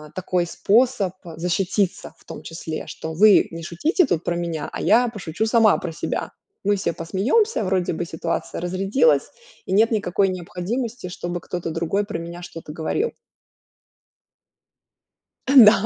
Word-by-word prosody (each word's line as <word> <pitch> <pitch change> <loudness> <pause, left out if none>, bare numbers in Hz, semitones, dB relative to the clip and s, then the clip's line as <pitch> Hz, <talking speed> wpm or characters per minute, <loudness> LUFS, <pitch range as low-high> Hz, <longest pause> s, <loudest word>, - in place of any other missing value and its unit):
такой 185 -1 0
способ, 210 +1 +2
а, 165 -2 -9
защититься, 180 +3 -1
в - - -24
том - - -8
числе 160 -1 -6
что: 160 - -6
"Вы 205 +5 +6
не 165 0 -7
шутите 305 - +1
тут 175 -8 -1
про 175 - -1
меня, 170 -3 -3
а - - -5
я 245 +1 +4
пошучу 200 -2 -3
сама 225 -1 +4
про 175 - -5
себя. 160 - -3 0.3
Мы 205 +1 +2
все 190 - -1
посмеемся, 215 - +1
вроде 185 -3 0
бы 175 +2 -3
ситуация 165 0 -3
разрядилась, 195 - +2 0.4
и - - -5
нет 220 +4 +4
никакой 200 -2 +1
необходимости, 185 +5 -4
чтобы 175 0 -4
кто-то 175 0 -5
другой 170 +5 0
про 200 -5 -4
меня 170 +1 -7
что-то 165 -3 -9
говорил". 395 - -1 2.3
Да. 240 -7 +8
185 Hz, 150 wpm, -22 LUFS, 170-220 Hz, 2.3 s, Да